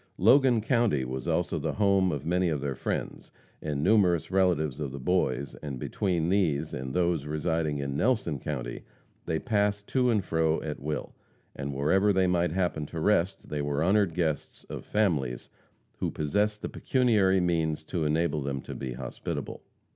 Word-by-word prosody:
Logan 125 +3 +5
county 110 - +2
was 65 +1 -5
also - - 0
the - - -2
home 100 -3 +3
of 70 -4 -4
many 90 +1 +2
of 75 -3 -1
their 70 0 -2
friends, - - -4 0.3
and 75 -2 -2
numerous 90 -5 +3
relatives 85 -8 +2
of 70 -3 -3
the 70 - -6
boys, 70 -3 0
and 70 -4 -5
between 85 - -1
these 80 -6 +1
and 65 0 -4
those 85 -5 +1
residing 80 0 -1
in 70 -1 -3
Nelson 95 - +1
county, - - -4 0.5
they 80 - 0
passed 105 +1 0
to 125 -2 +2
and 105 -5 +1
fro 80 -1 +1
at 75 -1 -4
will, 75 +1 -4 0.4
and 70 +1 -4
wherever 95 +9 +3
they 95 -1 +3
might 90 -2 +1
happen 85 -4 -1
to 80 - -6
rest, 95 +1 +1
they 75 -1 -2
were 70 +1 0
honored 95 -2 +2
guests 80 -4 -2
of - - -6
families 75 - 0 0.5
who - - 0
possessed 105 +8 -1
the - - -1
pecuniary 105 -7 +2
means 80 -3 0
to 85 +1 -2
enable 75 0 +1
them 70 0 -2
to - - -8
be 65 -2 -5
hospitable. 65 0 -5
80 Hz, 170 wpm, -28 LUFS, 75-95 Hz, 0.5 s, Logan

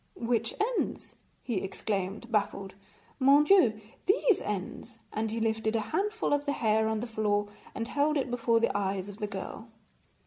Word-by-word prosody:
'Which 230 -1 -1
ends?' 460 +3 -1 0.3
he 235 -5 -2
exclaimed, 195 +3 -3
baffled. 200 -3 -1 0.5
'Mon 280 +2 +6
Dieu! 290 - +5 0.3
these 395 +2 +3
ends,' 220 +3 -5 0.2
and 220 +1 -1
he 225 +2 -3
lifted 220 0 0
a - - +3
handful 420 -3 0
of 290 0 0
the 285 - +2
hair 220 -3 +2
on 220 -1 -1
the - - -2
floor 210 -2 0 0.3
and 230 +1 -3
held 295 +3 +1
it 265 -3 -1
before 230 -1 +2
the 230 - +1
eyes 195 -1 -1
of 200 - -9
the 210 - -2
girl. 200 +3 -7
225 Hz, 170 wpm, -29 LUFS, 205-260 Hz, 0.5 s, Mon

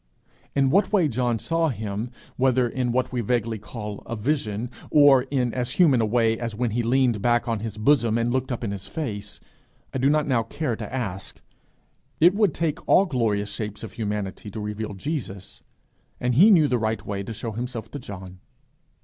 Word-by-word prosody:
In 135 -1 +3
what 200 +4 +3
way 190 -7 +4
John 120 -2 0
saw 165 +7 0
him, 110 -1 -4 0.3
whether 130 -1 +3
in 125 0 -1
what 125 +1 0
we 125 -2 -1
vaguely 115 -1 -1
call 105 -1 -7
a 115 - -3
vision, 115 -2 -2 0.2
or 140 -3 +6
in 125 -4 0
as 125 -1 -2
human 145 -10 +4
a 110 - +1
way 115 0 +2
as 115 -3 -4
when 120 0 -1
he 120 +3 0
leaned 120 -2 +2
back 120 +1 +2
on 115 -2 0
his 110 -1 -5
bosom 115 -1 +3
and 115 +1 0
looked 130 0 -1
up 120 - -3
in 105 - -2
his 100 -1 -6
face, 105 -10 -5 0.5
I 135 - -2
do 135 +2 +3
not 150 0 +2
now 130 -5 +2
care 130 +1 -3
to 110 -2 -7
ask: 100 -7 -4 0.8
it 175 +3 +6
would 205 -5 +2
take 165 0 -1
all 195 - +6
glorious 110 - 0
shapes 105 +1 -5
of 110 - -7
humanity 105 -2 -4
to 105 - -7
reveal 105 0 -4
Jesus, 100 - -5 0.6
and 125 0 0
he 180 - +7
knew 165 -8 +6
the 125 -3 +1
right 110 -1 -2
way 100 -1 -3
to 100 - -6
show 115 +1 -5
himself 115 0 -5
to 145 - -5
John. 95 -5 -9
120 Hz, 200 wpm, -24 LUFS, 105-130 Hz, 0.8 s, he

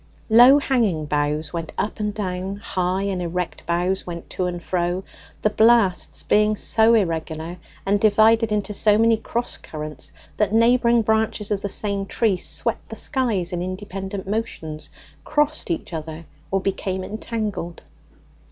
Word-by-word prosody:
Low 245 +5 +8
hanging 225 - +1
boughs 150 +1 -1
went 165 -2 -4
up 210 - -2
and 210 0 -1
down; 190 -2 -3
high 185 -2 -2
and 195 -2 -2
erect 175 -1 -4
boughs 175 +3 0
went 170 -1 -7
to 185 - -1
and 175 -1 -3
fro; 180 +1 -1 0.4
the 215 - +3
blasts 220 -4 +3
being 210 0 +3
so 225 +2 +4
irregular, 165 -3 -2 0.3
and 200 +1 +2
divided 220 +1 +4
into 210 0 -1
so 210 +1 +4
many 225 +1 +4
cross 235 +2 -3
currents, 150 -3 -7 0.3
that 210 -2 +1
neighbouring 235 0 +4
branches 220 -1 0
of 200 -1 0
the 200 - -3
same 200 0 -2
tree 215 -4 +1
swept - - -2
the - - -6
skies 220 -11 -1
in 175 - -2
independent 190 +1 -5
motions, 160 -8 -4 0.3
crossed 295 -3 0
each 170 +1 -3
other, 160 +1 -6 0.2
or 195 - +1
became 190 -1 -2
entangled. 210 -4 -4
195 Hz, 150 wpm, -22 LUFS, 175-220 Hz, 0.4 s, Low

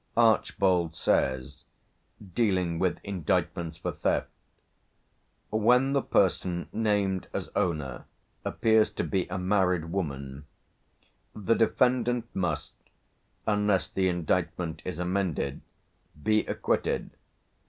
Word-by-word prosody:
Archbold 95 -7 +3
says 65 -5 0 0.7
dealing 90 -7 +1
with 90 -1 +1
indictments 85 -3 -1
for - - -3
theft - - -1 1.2
"Where 125 +5 +4
the 140 0 +2
person 90 -2 +1
named 105 -4 0
as - - -3
owner 75 -7 -1 0.4
appears 110 -1 +3
to - - -2
be 95 -2 -1
a - - -4
married 90 -3 +1
woman, 70 -6 -4 0.9
the 105 +1 +1
defendant 120 +1 +2
must, 85 -6 -2 0.7
unless 105 -2 +2
the 95 -1 +1
indictment 85 -1 -1
is 90 -4 -4
amended, 90 -6 -1 0.6
be 110 0 +2
acquitted... - - -1
95 Hz, 100 wpm, -28 LUFS, 85-105 Hz, 1.2 s, Where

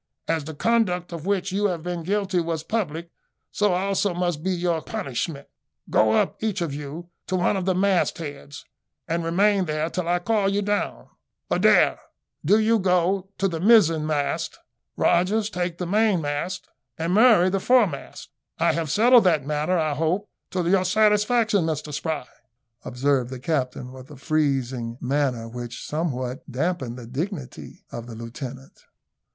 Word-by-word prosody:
As 160 -3 0
the 160 0 -7
conduct 180 -4 +1
of 165 +1 -6
which 200 -1 0
you 200 +2 0
have 175 -4 -3
been 175 -1 -3
guilty 195 +1 0
was 165 -2 -2
public, 170 -5 -3 0.4
so 205 -2 +2
also 195 0 0
must 175 -3 -1
be 190 - -2
your 175 -3 0
punishment. 155 - -4 0.4
Go 110 0 +4
up, - - +1
each 220 -3 -1
of 165 -5 -2
you, 150 +5 -7 0.2
to 185 - -1
one 180 +3 +2
of 190 -2 -2
the 190 -1 +1
mast 190 -1 +2
heads, 145 -3 -8 0.4
and 170 +1 -1
remain 195 +3 +2
there 155 +1 -2
till 180 -2 -3
I 175 +1 +2
call 200 +2 +1
you 200 +1 0
down. 205 +1 -2 0.4
Adair, - - +4 0.4
do 195 +8 +4
you 220 +1 +3
go 185 +1 +1
to 195 - +1
the 165 -3 -3
mizen 165 -7 +5
mast; 145 -2 -1 0.4
Rogers, 205 +5 +2
take 175 -2 -2
the 180 - -3
mainmast; 180 -4 0 0.3
and 165 +2 -1
Murray, 210 -4 +6
the 195 - +1
foremast. 205 - +1 0.3
I - - +2
have 165 -2 -2
settled 235 - +5
that 160 -6 +3
matter, 150 +5 0
I 155 -2 +1
hope, 165 +7 -1 0.2
to 180 -2 -1
your 185 +1 +3
satisfaction, 210 0 +3
Mr 155 -1 -3
Spry," 155 -2 -3 0.6
observed 130 0 0
the 130 - -6
captain, 125 -3 -2
with 130 +1 -12
a 145 - -11
freezing 130 -5 -1
manner, 130 -3 -1
which 120 +1 -7
somewhat 135 -4 -3
damped 135 -3 -2
the 125 -2 -9
dignity 140 - -6
of 120 0 -7
the 115 - -8
lieutenant. 125 +3 -9
170 Hz, 160 wpm, -24 LUFS, 145-195 Hz, 0.6 s, Murray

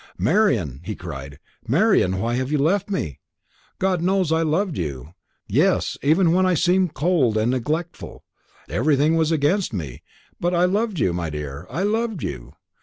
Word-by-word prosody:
"Marian," 100 - +1
he - - -5
cried, 70 +1 -8 0.3
"Marian, 95 +1 +3
why 115 +5 -1
have 130 +3 -2
you 150 - +2
left 185 +8 +1
me? 80 - -3 0.6
God 185 -2 0
knows 185 -2 +1
I 160 0 +2
loved 165 +2 0
you; 70 -1 -5 0.3
yes, - - +1
even 165 +4 +3
when 185 +1 +3
I 185 -1 +3
seemed 180 0 +2
cold 140 -7 +2
and 110 +3 +1
neglectful. 155 +7 -4 0.4
Everything 145 - +2
was 160 -1 +1
against 160 - +1
me; 75 - -5 0.4
but 175 +1 0
I 175 +1 +4
loved 205 +2 0
you, 90 - +1
my 85 -2 -3
dear, 75 +2 -6
I 165 +9 -2
loved 220 -2 -1
you! - - -6
155 Hz, 165 wpm, -22 LUFS, -, 0.6 s, I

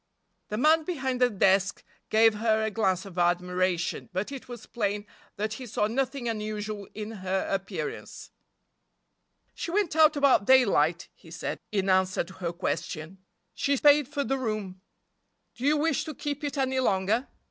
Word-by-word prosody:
The 210 - -4
man 315 +6 +4
behind 265 -7 -2
the 250 - +5
desk 195 -2 +2 0.3
gave 225 0 +5
her 220 0 +1
a 220 - -1
glance 190 -3 0
of 185 -2 -7
admiration, 180 0 0
but 190 +7 -3
it 275 -2 -8
was 240 -2 -8
plain 205 -2 -2 0.3
that 215 +1 -2
he 255 +2 -7
saw 210 -1 0
nothing 260 +2 -2
unusual 215 -2 -4
in 215 +1 -5
her 190 +1 -1
appearance. 195 -1 -5 1.2
"She - - -5
went 365 -3 0
out 315 -1 +6
about 280 -7 +4
daylight," 195 - +4
he 165 - -18
said, 165 0 -5
in 195 -2 0
answer 185 0 +2
to 185 +2 -13
her 175 -3 -4
question. 170 0 -4 0.3
"She 280 0 0
paid 290 0 +5
for 285 0 -2
the 270 0 -1
room. 215 -6 -4 0.7
Do 245 - -6
you 300 +1 +4
wish 320 +2 +1
to 310 -3 -6
keep 290 +1 -4
it 290 0 -3
any 265 -1 +1
longer?" 210 +2 +1
215 Hz, 165 wpm, -27 LUFS, 190-270 Hz, 1.2 s, out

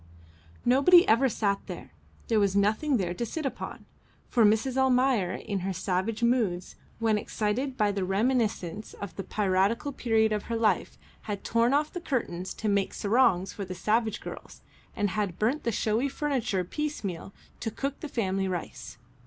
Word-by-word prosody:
Nobody 280 +8 +6
ever 245 +5 +4
sat 200 -3 0
there; - - -8 0.4
there 225 -2 +3
was 200 -1 +2
nothing 215 +8 +2
there 175 -4 -1
to 210 - -3
sit 300 +6 -4
upon, 255 -2 -5 0.4
for 235 - +3
Mrs. 220 +5 +3
Almayer 255 -7 +3
in 205 -3 -3
her 190 +1 -2
savage 190 +5 -1
moods, 220 -7 +1 0.2
when 220 -2 +2
excited 245 +7 -2
by 210 -2 +2
the 200 -1 -2
reminiscences 210 -1 -1
of 200 - -7
the 195 - -4
piratical 205 +7 +1
period 225 -4 +2
of 210 -1 -1
her 230 - -3
life, 215 -5 +1 0.3
had 205 -1 -3
torn 230 +1 +2
off 300 +1 0
the 355 - -5
curtains 190 - -3
to 220 - -3
make 200 -2 +1
sarongs 205 -4 +2
for 200 - -5
the 185 -1 -6
slave 220 +4 0
girls, - - -9 0.3
and 205 -2 0
had 190 -2 -2
burnt 245 +8 0
the 235 - +2
showy 225 +5 0
furniture 260 -10 -1
piecemeal 200 - -4 0.3
to 225 - -2
cook 275 +5 -4
the 305 - -6
family 195 -6 -1
rice. 180 -8 -5
215 Hz, 170 wpm, -28 LUFS, 195-250 Hz, 0.4 s, Nobody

